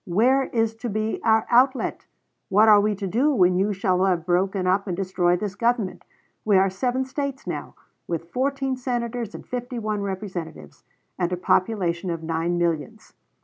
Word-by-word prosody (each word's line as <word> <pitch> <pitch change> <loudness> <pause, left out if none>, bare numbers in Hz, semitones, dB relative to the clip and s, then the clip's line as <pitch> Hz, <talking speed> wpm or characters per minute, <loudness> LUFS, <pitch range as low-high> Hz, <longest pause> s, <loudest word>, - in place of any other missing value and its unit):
Where 250 +9 +3
is 225 -1 0
to 240 +1 -4
be 215 +1 -2
our 220 -1 +3
outlet! 255 +2 +2 0.4
What 210 +3 +5
are 210 -1 +7
we 210 0 +1
to 200 0 -5
do 245 +11 +2
when 180 -3 +4
you 195 +3 +1
shall 185 -2 +1
have 175 -4 0
broken 185 +2 +1
up 195 +3 +1
and 175 -2 -3
destroyed 180 -2 +1
this 205 -1 -3
government? 230 -2 -1 0.4
We 205 -3 +4
are 190 0 +3
seven 250 +6 -1
States 275 0 -4
now, - - -5 0.3
with 170 0 -4
fourteen 270 +1 -1
Senators 240 -3 -3
and - - -9
fifty 250 0 -5
one 215 -2 -2
Representatives, 185 - -6 0.4
and 175 -1 0
a 180 - -1
population 185 -1 0
of 165 -1 -4
nine 165 +2 -1
millions. 170 +5 -2
200 Hz, 175 wpm, -24 LUFS, 180-235 Hz, 0.4 s, are